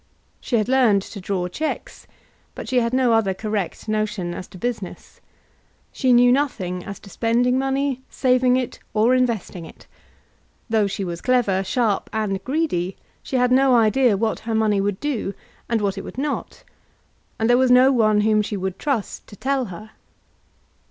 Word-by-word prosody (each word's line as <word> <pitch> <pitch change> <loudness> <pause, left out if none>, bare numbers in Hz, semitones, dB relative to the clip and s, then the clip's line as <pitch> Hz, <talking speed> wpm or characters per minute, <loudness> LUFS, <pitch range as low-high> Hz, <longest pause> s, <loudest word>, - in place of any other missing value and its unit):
She 245 - -2
had 215 -3 +1
learned 245 -7 +3
to 200 - -9
draw 185 -1 -2
cheques, 305 - -5 0.5
but - - -7
she 255 -1 +2
had 230 -1 0
no 255 -2 +2
other 205 -4 +2
correct 210 -1 -4
notion 215 -5 -2
as 180 - -7
to - - -13
business. 220 -3 -6 0.7
She 260 - +1
knew 245 0 +6
nothing 195 -10 -1
as 200 - -8
to 200 - -13
spending 245 +4 +1
money, 270 0 -1
saving 255 -1 +2
it, 255 -2 -4 0.2
or 225 +4 +4
investing 235 -8 -1
it. - - -14 0.9
Though 215 -2 +3
she 195 0 -4
was 175 -2 -5
clever, 230 -7 +2
sharp, 215 0 0
and 210 -3 -2
greedy, 255 - -1 0.2
she - - -5
had 250 -1 +2
no 260 0 +5
idea 230 0 +3
what 220 +2 -1
her 225 0 -3
money 215 -2 +2
would 200 -1 -2
do, 245 -9 -3 0.3
and 230 -2 +1
what 200 -1 -1
it - - -7
would - - -10
not; 290 +2 -4 0.7
and 220 - 0
there 245 - +5
was 260 -1 +3
no 250 +2 +6
one 215 -4 +3
whom 215 0 +3
she 210 0 -4
would 190 0 -4
trust 270 -8 -3
to - - -12
tell 265 +4 -1
her. 215 +3 -10
225 Hz, 175 wpm, -22 LUFS, 200-255 Hz, 0.9 s, knew